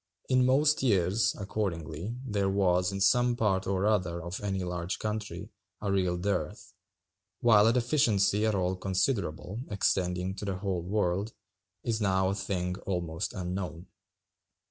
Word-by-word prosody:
In 130 -1 +4
most 145 +3 +3
years, 100 -3 +2
accordingly, 95 -1 -3
there 100 -5 0
was, 90 -1 +2
in 100 - -4
some 120 +5 +3
part 95 -5 +1
or 95 0 0
other 90 -5 +1
of 85 +2 -6
any 95 -2 -2
large 90 0 -3
country, 105 0 -4 0.3
a 100 -2 -2
real 90 -2 +1
dearth; 100 +3 -3 0.7
while 110 -3 +6
a 115 - +4
deficiency 115 -5 +2
at 110 - +1
all 95 -1 0
considerable, 95 - -1
extending 90 -2 0
to 105 - -5
the 95 -2 -2
whole 95 -2 -2
world, 100 +2 -1 0.5
is 115 -2 -1
[now] 95 -2 +2
a - - 0
thing 90 -2 -2
almost 85 -5 -3
unknown. 90 -3 -5
95 Hz, 145 wpm, -29 LUFS, 90-105 Hz, 0.7 s, while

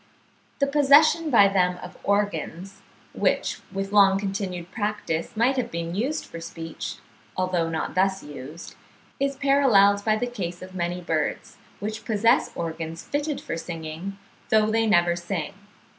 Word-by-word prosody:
The 280 - +2
possession 295 +3 +5
by 215 -7 +7
them 180 -2 +2
of 180 - -9
organs, 195 -1 -2 0.3
which - - 0
with 195 0 -3
long 195 -2 +6
continued 195 -3 -4
practice 205 -4 -3
might 250 +4 +3
have 240 -2 -1
been 170 -2 -4
used 255 +11 -1
for 165 - -9
speech, 165 -1 -6 0.4
although 180 -3 0
not 160 -1 -3
thus 190 +1 +1
used, 145 +3 -9 0.5
is 275 0 0
paralleled 250 -8 +4
by 215 0 +3
the 215 - -1
case 185 -8 -5
of 185 0 -10
many 175 0 -2
birds 160 -3 -2 0.2
which 215 +2 -4
possess 230 +3 +3
organs 165 0 -5
fitted 290 0 -2
for - - -4
singing, 165 +3 -6 0.3
though 215 0 +4
they 225 0 +2
never 175 -4 +4
sing. 175 -2 -4
195 Hz, 145 wpm, -25 LUFS, 170-220 Hz, 0.5 s, by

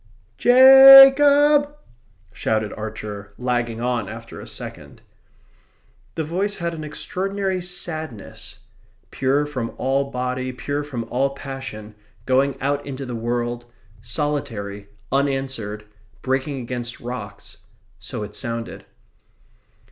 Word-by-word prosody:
Ja 270 +2 +10
cob!" 290 0 +4 0.6
shouted 110 -1 -1
Archer, 105 -2 -7
lagging 120 -2 -2
on 120 -4 -2
after 115 +1 -9
a - - -11
second. - - -9 1.1
The 160 - -2
voice 190 +6 -2
had 170 -1 -3
an 155 -1 -7
extraordinary 190 +4 -3
sadness. 160 - -7 0.5
Pure 135 +3 +1
from 130 -6 -5
all 135 +1 0
body, 125 0 -3
pure 145 +3 -3
from 130 -5 -5
all 135 +2 0
passion, 130 -7 -8 0.3
going 135 +2 +1
out 140 +1 -1
into 135 -1 -6
the 125 - -6
world, 120 +1 -3 0.4
solitary, 115 -6 -4 0.2
unanswered, 135 -6 -2 0.4
breaking 135 +1 -1
against 120 +1 -6
rocks 110 -5 -8 0.4
so 110 +2 -6
it 105 0 -8
sounded. 115 0 -5
130 Hz, 110 wpm, -22 LUFS, 115-150 Hz, 1.1 s, Ja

